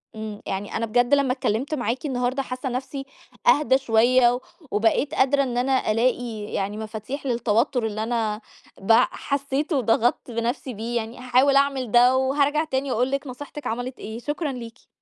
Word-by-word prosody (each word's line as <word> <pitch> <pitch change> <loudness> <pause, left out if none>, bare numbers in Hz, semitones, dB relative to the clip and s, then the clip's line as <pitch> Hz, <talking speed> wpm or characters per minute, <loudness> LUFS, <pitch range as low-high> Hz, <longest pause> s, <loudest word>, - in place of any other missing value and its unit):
إمم. 215 -1 -6
يعني 195 +1 -4
أنا 230 - -1
بجد 245 +4 +2
لما 275 -3 +3
اتكلِّمت 255 +3 -2
معاكِ 245 0 -2
النهاردة 255 0 -1
حاسّة 255 0 -4
نَفْسي 265 +2 -4 0.4
أهدى 265 -3 +5
شوية 245 0 +3 0.3
وبقيت 225 +7 +1
قادرة 275 +1 +3
إن 245 -2 -3
أنا 260 -2 +1
ألاقي 235 0 0
يعني 200 +2 -2
مفاتيح 220 +6 -6
للتوتُّر 240 0 +1
اللي 215 0 -2
أنا 220 -2 -1 0.4
بع 225 +4 +5
حسّيته 280 +2 -2
وضغطت 240 0 +1
بنَفْسي 240 +3 -2
بيه 230 +3 -5
يعني 225 +1 -4
هاحاول 255 +2 +3
أعمل 275 -4 +2
ده 245 +2 +6
وهارجع 285 +3 +2
تاني 270 -3 -2
أقول 250 +3 +1
لِك 275 +1 -2
نصيحتك 290 +3 -7
عَمَلِت 245 +2 -4
إيه، 220 +2 -6
شكرًا 295 +3 -3
ليكِ. 240 -2 -9
250 Hz, 160 wpm, -24 LUFS, 225-270 Hz, 0.4 s, ده